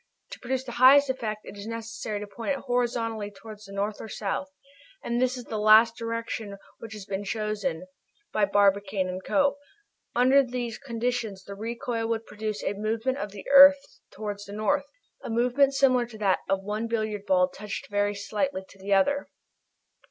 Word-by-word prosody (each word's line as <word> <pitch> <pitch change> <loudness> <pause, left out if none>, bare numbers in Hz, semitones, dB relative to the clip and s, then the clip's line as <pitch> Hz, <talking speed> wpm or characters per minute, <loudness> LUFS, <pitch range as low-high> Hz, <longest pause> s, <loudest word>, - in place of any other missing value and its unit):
To - - -8
produce 255 +1 -2
its 240 -2 -8
highest 270 +2 +7
effect 215 -5 -4
it - - -9
is 200 +1 -8
necessary 225 -2 -5
to - - -4
point 225 +7 -3
it - - -10
horizontally 235 -4 -1
towards 215 +1 -12
the 195 - -12
north 205 +1 -3
or 220 - -8
south, 210 +8 -3 0.6
and 240 +1 -1
it - - +5
is 255 0 +1
this 245 -3 -8
last 215 +2 +6
direction 230 -3 -4 0.2
which 225 -1 -9
has 210 -2 -8
been 195 +1 -4
chosen 205 -5 -3 0.5
by 210 - +3
Barbicane 195 -2 +1
& - - -29
Co. 285 -1 +2 0.6
Under 260 +3 +5
these 245 -3 -4
conditions 235 -5 -3
the 200 - -8
recoil 230 +2 -3
will 230 0 +1
produce 215 -1 -5
a - - -1
movement 225 +6 -2
of 205 - -3
the 200 -1 -10
earth 280 +1 +10 0.3
towards 205 -1 -6
the 200 - -10
north, 245 +7 0 0.4
a - - -6
movement 250 +4 +2
similar 255 -3 +3
to 230 -2 -11
that 200 -3 +2
of 195 0 0
one 210 +3 -3
billiard 215 -3 -2
ball 180 -1 +4
touched 210 +2 -7
very 205 0 +1
slightly 205 +2 -2
by 190 0 -18
another." 200 +9 +2
220 Hz, 180 wpm, -27 LUFS, 205-245 Hz, 0.6 s, earth